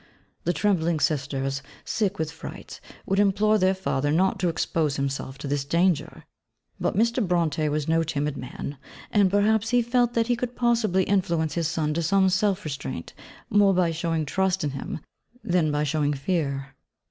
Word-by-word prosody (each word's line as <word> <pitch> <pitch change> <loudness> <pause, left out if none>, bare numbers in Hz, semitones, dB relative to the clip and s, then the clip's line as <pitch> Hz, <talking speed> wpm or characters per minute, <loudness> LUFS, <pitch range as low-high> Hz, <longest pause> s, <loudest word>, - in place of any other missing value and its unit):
The 175 - +3
trembling 170 -6 +1
sisters, 135 -2 -1 0.2
sick 200 -3 -1
with 160 0 -2
fright, 160 - -9 0.2
would 195 +1 +1
implore 210 +2 +3
their 190 0 +3
father 145 -6 -1
not 190 +5 +2
to 180 -1 +1
expose 160 -3 0
himself 135 -1 -3
to - - -6
this 140 0 0
danger. 170 +3 0 0.6
But - - -1
Mr. 235 +2 +2
Brontë 165 -4 +1
was 150 0 -1
no 165 0 +3
timid 150 -2 -2
man; 130 +2 -7 0.3
and 205 -3 +4
perhaps 210 +3 +2
he 245 0 +3
felt 240 0 +1
that 230 -1 +3
he 245 +1 +1
could 245 +1 -4
possibly 230 -6 +2
influence 170 -5 0
his 170 -2 0
son 155 -2 -1
to 170 - -1
some 190 +3 +3
self 190 +1 +1
restraint 140 - -5 0.4
more 200 -2 +5
by 175 -2 +2
showing 165 -1 -1
trust 190 +3 0
in 145 - -1
him 135 +2 -5 0.4
than 175 -4 +1
by 145 0 0
showing 150 0 +1
fear. 140 -3 -2
170 Hz, 170 wpm, -25 LUFS, 150-200 Hz, 0.6 s, more